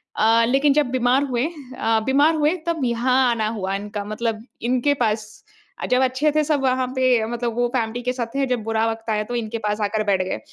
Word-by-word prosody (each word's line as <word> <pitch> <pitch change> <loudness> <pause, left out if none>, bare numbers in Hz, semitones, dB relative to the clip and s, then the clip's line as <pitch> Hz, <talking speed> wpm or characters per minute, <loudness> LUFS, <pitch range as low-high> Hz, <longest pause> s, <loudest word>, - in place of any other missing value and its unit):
अ, 225 +1 +4
लेकिन 275 +4 +3
जब 300 -1 +3
बीमार 255 +2 +2
हुए 250 -2 -1 0.3
अ, 225 0 +2
बीमार 290 +4 +3
हुए 305 +3 +2
तब 330 -3 -1
यहाँ 240 +2 +1 0.2
आना 220 -2 0
हुआ 190 0 -2
इनका 205 +1 -5
मतलब 220 +1 -3 0.2
इनके 255 +4 +1
पास। 215 0 -1 0.6
अ, - - 0
जब 250 +1 +2
अच्छे 260 +4 +1
थे 305 0 +2
सब 295 -2 0
वहाँ 255 -1 +1
पे 255 -4 +3
मतलब 235 0 -3
वो 245 0 +2
फैमिली 235 0 -1
के 250 +1 -1
साथ 245 -2 -3
थे 275 - +1
जब 250 -3 -1
बुरा 225 +1 0
वक़्त 225 0 -8
आया 215 -1 0
तो 245 +3 -5
इनके 230 -1 -3
पास 210 +1 -1
आकर 215 +1 0
बैठ 195 -2 +2
गए। 185 - -4
240 Hz, 220 wpm, -22 LUFS, 220-260 Hz, 0.6 s, अ